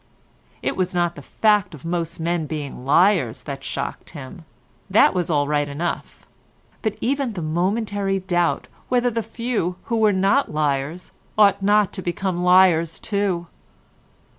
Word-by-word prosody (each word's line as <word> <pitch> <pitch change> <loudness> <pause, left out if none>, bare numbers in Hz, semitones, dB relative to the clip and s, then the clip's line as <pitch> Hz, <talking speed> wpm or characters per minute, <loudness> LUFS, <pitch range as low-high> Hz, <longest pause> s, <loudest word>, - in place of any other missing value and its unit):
It - - -1
was 185 0 -1
not 175 -1 +1
the 145 - -10
fact 205 +2 +1
of 145 - -14
most 170 0 -3
men 165 -1 -1
being 145 -5 -6
liars 140 - +3
that 140 0 -6
shocked - - -4
him—that 150 - -1
was 180 -2 -1
all 145 -3 +2
right 145 -1 0
enough; 160 +5 -4 0.6
but 215 -2 -2
even 270 -1 0
the 180 - -5
momentary 195 +4 0
doubt 175 -2 0 0.2
whether 245 -1 +2
the 230 0 -1
few 230 -6 -2
who 230 - -1
were 215 -1 +4
not 195 +8 +2
liars 150 +2 -2 0.3
ought 200 -2 +5
not 205 0 +3
to 190 - -4
become 180 0 -2
liars 180 -3 +4
too. 200 -4 -1
180 Hz, 145 wpm, -22 LUFS, 155-205 Hz, 0.6 s, ought